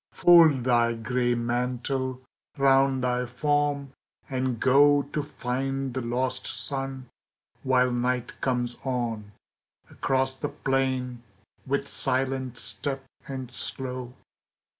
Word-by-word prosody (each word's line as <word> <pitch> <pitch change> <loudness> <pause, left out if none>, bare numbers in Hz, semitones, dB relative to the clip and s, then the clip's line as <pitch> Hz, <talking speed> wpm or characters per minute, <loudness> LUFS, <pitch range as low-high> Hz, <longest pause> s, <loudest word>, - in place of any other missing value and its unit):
Fold 165 -6 +6
thy 120 -1 +2
gray 120 +1 0
mantle 125 +2 -2 0.4
round 135 -1 +3
thy 125 0 0
form 145 +1 0 0.3
and 130 -3 -2
go 145 +2 +5
To 145 +2 -3
find 135 -1 -3
the 130 - -2
lost 125 +2 -2
sun, 135 -2 -3 0.5
while 125 -1 +3
Night 125 0 -1
comes 125 -2 -1
on, 115 -5 -3 0.6
Across 130 0 0
the 145 - -3
plain, 130 -3 -1 0.5
with 140 +1 -1
silent 130 -2 0
step 135 -1 0 0.2
and 130 -2 -6
slow. 125 -1 -4
130 Hz, 105 wpm, -26 LUFS, 125-135 Hz, 0.6 s, Fold